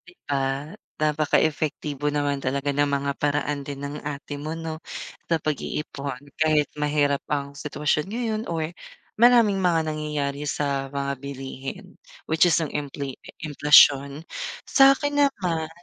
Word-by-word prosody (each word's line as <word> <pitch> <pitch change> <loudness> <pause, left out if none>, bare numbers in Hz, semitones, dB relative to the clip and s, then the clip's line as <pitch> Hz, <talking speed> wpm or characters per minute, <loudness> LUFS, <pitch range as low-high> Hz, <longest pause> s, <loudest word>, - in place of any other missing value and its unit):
Di 175 - -14
ba? 140 +2 -1 0.3
Napaka-epektibo 150 -1 +1
naman 145 -1 0
talaga 140 +2 -1
ng 145 +1 +3
mga 140 0 0
paraan 145 0 0
din 140 -1 -6
ng 145 +1 -6
ate 145 0 -5
mo 150 +2 -4
no, 165 -1 -5 0.5
sa 165 - +3
pag-iipon 140 -3 -3 0.2
kahit 155 -1 +3
mahirap 145 -1 +1
ang 140 -1 -2
sitwasyon 150 0 -1
ngayon 220 -1 -2
or, 160 -2 -1 0.5
maraming 235 -4 +6
mga 175 -3 +3
nangyayari 150 -2 -3
sa 140 -2 -1
mga 140 0 -1
bilihin. 135 -1 -6 0.4
Which 160 +2 +5
is - - +4
yung 155 - -2
infla 140 -2 -4 0.3
emplasyon, 145 -1 +5 0.4
sa'kin 290 +1 +5
naman 175 - -1
150 Hz, 130 wpm, -25 LUFS, 140-160 Hz, 0.5 s, maraming